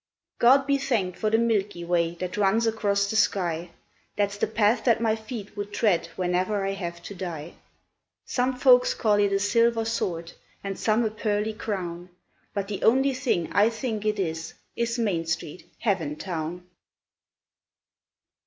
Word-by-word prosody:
God 270 +3 +6
be 280 0 +2
thanked 215 -10 -1
for 215 - +1
the 225 - +3
Milky 205 -6 0
Way 170 -1 +1
that 180 +1 -5
runs 210 +3 +2
across 205 -3 +1
the 220 - -3
sky, 175 -5 +1 0.5
That's 200 -1 0
the 205 - 0
path 220 +1 +2
that 235 -3 +4
my 225 -1 +2
feet 220 -2 -8
would 205 0 -5
tread 205 -4 +1
whenever 185 +3 0
I 195 - 0
have 170 -3 -5
to - - -7
die. 170 -4 -6 0.7
Some 255 +1 0
folks - - +5
call 210 - +2
it 205 -1 +3
a 195 - +3
Silver 230 +3 +2
Sword, 170 -7 -2 0.3
and 195 -1 -4
some 225 +1 +2
a 215 - -1
Pearly 215 0 -1
Crown, 180 -5 -5 0.4
But 200 -1 -3
the 200 -2 -5
only 265 +4 +4
thing 255 - -1
I 210 +2 +5
think 225 -2 -3
it 215 0 0
is, 165 -3 -3 0.2
is 235 +1 -1
Main 185 -8 0
Street, 165 0 -4 0.2
Heaventown. 170 -2 -2
205 Hz, 160 wpm, -26 LUFS, 180-225 Hz, 0.7 s, God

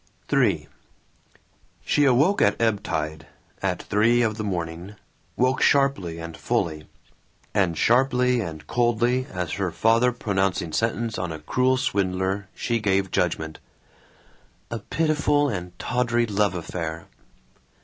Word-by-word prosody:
III - - +2 1.2
She 145 - +3
awoke 140 +10 +3
at 100 - +3
ebb 110 -3 +1
time, 80 -5 -3 0.4
at - - -1
three 115 +4 +3
of 110 -2 0
the 110 - -4
morning, 90 0 -4 0.4
woke 130 +1 +1
sharply 135 -13 +2
and 85 0 -7
fully; 75 -2 -2 0.7
and 95 -6 +1
sharply 125 +1 +3
and 80 -6 -6
coldly 120 +4 +1
as 90 -3 -3
her 100 -2 -1
father 115 +7 +3
pronouncing 95 -8 -1
sentence 115 0 -1
on 90 -2 -3
a 80 - -5
cruel 125 +12 +1
swindler 95 -5 -1
she 115 -1 -1
gave 95 -2 +1
judgment: 80 -4 -1 1.1
"A 115 - -3
pitiful 145 +2 +1
and 90 -5 -5
tawdry 120 +1 0
love 105 -3 +1
affair. 80 -1 -5
105 Hz, 125 wpm, -24 LUFS, 90-125 Hz, 1.2 s, She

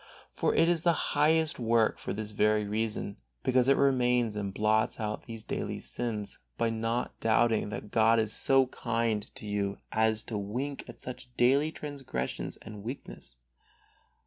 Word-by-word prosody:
For - - 0
it 165 - +5
is 170 -2 +2
the 170 0 +4 0.2
highest 155 +1 +3
work 115 -1 +2
for - - -4
this 105 +1 -4
very 105 0 +2
reason, 105 -1 -2 0.3
because 130 0 +3
it 135 - +5
remains 125 -4 +2
and 100 -2 -3
blots 110 +4 +1
out 105 -1 -4
these 115 -2 -7
daily - - -3
sins 110 -4 -3 0.2
by 115 -1 +1
not 115 +2 -2
doubting 115 -1 +2
that 105 0 -6
God 115 0 +4
is 110 -1 +1
so 135 -1 +5
kind 115 -3 -1
to - - -8
you 100 -1 -1
as 110 0 +2
to 110 -3 -4
wink 125 +8 -4
at - - -12
such 125 0 -7
daily 140 +5 +4
transgression 140 - -4
and 105 -2 -9
weakness. 110 - -7
115 Hz, 160 wpm, -30 LUFS, 105-125 Hz, 0.3 s, it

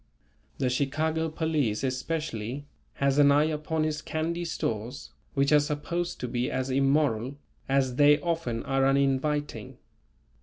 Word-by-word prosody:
The 130 -2 0
Chicago 155 +5 0
police 155 -9 -1
especially, 130 -2 -3 0.3
has 140 +1 +1
an 140 -1 +7
eye 145 +1 +5
upon 155 +1 -1
his 155 -1 -1
candy 170 +3 -2
stores 120 -4 -4 0.2
which 140 +1 +2
are 150 - +7
supposed 150 +4 -2
to 125 - -2
be 120 +1 -1
as 130 +1 -2
immoral 135 -2 +1 0.3
as 130 -2 +1
they 145 0 +6
often 160 -10 -2
are 135 -1 +1
uninviting. 140 -3 0
140 Hz, 130 wpm, -28 LUFS, 130-155 Hz, 0.3 s, an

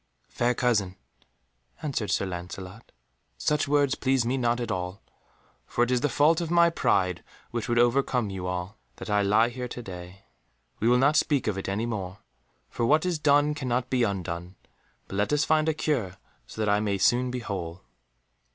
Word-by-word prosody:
"Fair 120 +1 0
cousin," 105 -7 +1 0.9
answered 130 -8 -2
Sir - - +1
Lancelot, 95 +3 -8 0.5
"such 150 0 0
words 145 -1 +3
please 130 -3 +1
me 125 +3 0
not 120 -2 +1
at 120 -2 -3
all, 90 0 -3 0.7
for 120 - +1
it 120 - 0
is 125 -1 +2
the 145 - +1
fault 155 +6 +3
of 170 - -3
my 170 0 +5
pride 90 - +1 0.3
which 120 -1 -3
would 120 - +1
overcome 120 -2 +2
you 95 -1 -4
all, 90 +3 -4 0.2
that 110 - -7
I 105 0 +3
lie 105 +4 +3
here 125 +1 -5
to 120 0 -7
day. 90 0 -10 0.5
We 110 - +1
will 125 +1 +5
not 140 +4 +4
speak 145 -3 +2
of 105 - 0
it 95 0 -4
any 105 +4 -1
more, 100 -5 -4 0.5
for - - -4
what 155 +8 +3
is 175 -3 0
done 145 0 +3
cannot 125 -3 -2
be 130 -1 +2
undone, 90 -4 -2 0.5
but 95 - -6
let 105 +5 +1
us 150 +1 +2
find 155 0 +2
a - - +2
cure 115 - -1 0.3
so - - -11
that 110 - 0
I 105 0 +3
may 105 -2 0
soon 125 +5 +3
be 125 - -3
whole." 95 -7 -5
120 Hz, 190 wpm, -27 LUFS, 95-135 Hz, 0.9 s, my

